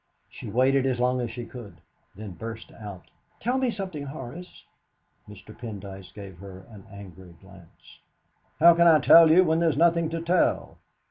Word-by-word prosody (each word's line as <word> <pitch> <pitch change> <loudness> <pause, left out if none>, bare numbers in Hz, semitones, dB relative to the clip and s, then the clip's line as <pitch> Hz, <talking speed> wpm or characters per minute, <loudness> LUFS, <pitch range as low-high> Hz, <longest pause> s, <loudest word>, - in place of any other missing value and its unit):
She - - -9
waited 130 +4 +2
as 125 -2 -2
long 125 +1 0
as 120 - -4
she 120 +1 -8
could, 115 -4 -12 0.4
then 105 0 -9
burst 115 +6 -9
out: 100 -5 -11 0.4
"Tell 250 +3 -1
me 260 -1 0
something, 185 -10 -6
Horace!" 145 +5 -10 0.7
Mr. 105 +1 -14
Pendyce 100 -5 -9
gave 95 -4 -12
her 95 -1 -12
an 105 -1 -14
angry 95 -3 -13
glance. 95 -4 -19 0.6
"How 170 +2 +7
can 170 +1 +3
I 160 -2 +7
tell 165 +3 +7
you, 175 +4 +6
when 160 -2 +1
there's 165 -4 +1
nothing 170 0 +2
to 165 0 -4
tell? 170 +2 0
125 Hz, 170 wpm, -25 LUFS, 100-165 Hz, 0.7 s, How